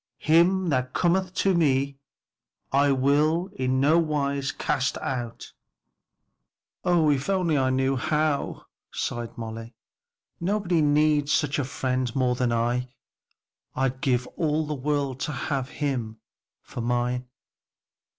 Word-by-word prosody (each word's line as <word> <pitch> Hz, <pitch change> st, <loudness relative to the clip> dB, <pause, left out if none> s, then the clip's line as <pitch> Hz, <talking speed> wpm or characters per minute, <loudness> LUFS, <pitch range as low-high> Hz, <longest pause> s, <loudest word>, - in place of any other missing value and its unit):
'Him 175 Hz, +3 st, +3 dB
that 130 Hz, -3 st, 0 dB
cometh 185 Hz, +1 st, +2 dB
to 195 Hz, -1 st, +2 dB
me, 140 Hz, -4 st, +1 dB, 0.7 s
I 140 Hz, +1 st, +4 dB
will 150 Hz, +7 st, +2 dB
in 130 Hz, 0 st, 0 dB
no 150 Hz, +5 st, +4 dB
wise 140 Hz, -3 st, -1 dB
cast 130 Hz, +1 st, -1 dB
out.'" 120 Hz, -3 st, -5 dB, 1.3 s
"Oh, 170 Hz, -4 st, +3 dB
if 140 Hz, +4 st, -1 dB
I -, -, +3 dB
only 160 Hz, -8 st, +1 dB
knew 130 Hz, +1 st, +1 dB
how!" 150 Hz, +2 st, -1 dB, 0.3 s
sighed 120 Hz, -1 st, -4 dB
Molly, 115 Hz, 0 st, -7 dB, 0.6 s
"nobody 180 Hz, -2 st, +1 dB
needs 150 Hz, 0 st, +3 dB
such 150 Hz, 0 st, +1 dB
a -, -, +1 dB
friend 130 Hz, -2 st, -2 dB
more 130 Hz, -2 st, +2 dB
than 125 Hz, -1 st, 0 dB
I. 120 Hz, +2 st, 0 dB, 0.9 s
I'd 130 Hz, 0 st, -1 dB
give 125 Hz, -2 st, +1 dB
all 155 Hz, -1 st, +1 dB
the 150 Hz, -, -3 dB
world 140 Hz, -1 st, -1 dB
to 150 Hz, -, -2 dB
have 135 Hz, -2 st, -2 dB
him 125 Hz, -8 st, -3 dB, 0.4 s
for 120 Hz, -, -7 dB
mine." 125 Hz, +1 st, -1 dB
140 Hz, 125 wpm, -26 LUFS, 130-155 Hz, 1.3 s, I